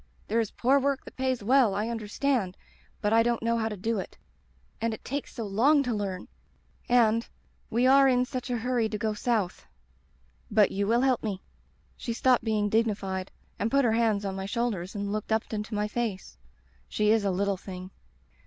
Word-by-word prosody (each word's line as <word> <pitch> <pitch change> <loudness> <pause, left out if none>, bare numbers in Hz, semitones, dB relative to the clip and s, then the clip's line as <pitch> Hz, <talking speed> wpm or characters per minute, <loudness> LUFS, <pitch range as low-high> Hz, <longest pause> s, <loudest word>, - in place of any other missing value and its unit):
There 225 +2 +2
is 225 -3 0
poor 270 +3 +2
work 280 0 -1
that - - -12
pays 260 -4 -1
well, 240 -3 +4
I 210 +2 -1
understand, 225 -2 -1 0.4
but 210 +1 +1
I 225 - +6
don't 235 0 0
know 230 0 +1
how 220 0 0
to 210 - -6
do 220 +3 -1
it. - - -7 0.6
And 230 -1 0
it - - -19
takes 280 +2 -4
so 230 - -3
long 265 +9 +3
to 245 -3 -1
learn; 195 -3 -3 0.6
and 230 -2 +3 0.2
— - - -38
^we 240 +3 +3
are 275 +1 +6
in 250 -1 +3
such 255 0 -5
a 245 - 0
hurry 235 -1 0
to 210 - -3
go 215 0 -1
South. 210 -4 -1 0.8
But 210 -2 +4
you 200 +1 -1
will 235 +3 +3
help 260 -2 +2
me 200 -4 -4 0.2
— - - -37
' - - -37
She 235 - -4
stopped 250 0 +3
being 215 -2 +1
dignified 200 -4 -1 0.3
and 215 - 0
put 275 +1 +3
her 230 - +3
hands 220 -3 +1
on 190 -1 -3
my 195 0 -4
shoulders 205 -5 -2
and 200 0 -3
looked 215 +1 -4
up 220 0 0
into 210 +1 -3
my 210 0 0
face 210 - -4 0.2
— 65 +3 -35
she 210 0 +2
is 220 -1 +3
a 200 - +1
little 200 +2 0
thing. 185 0 -8
220 Hz, 210 wpm, -28 LUFS, 200-240 Hz, 0.8 s, I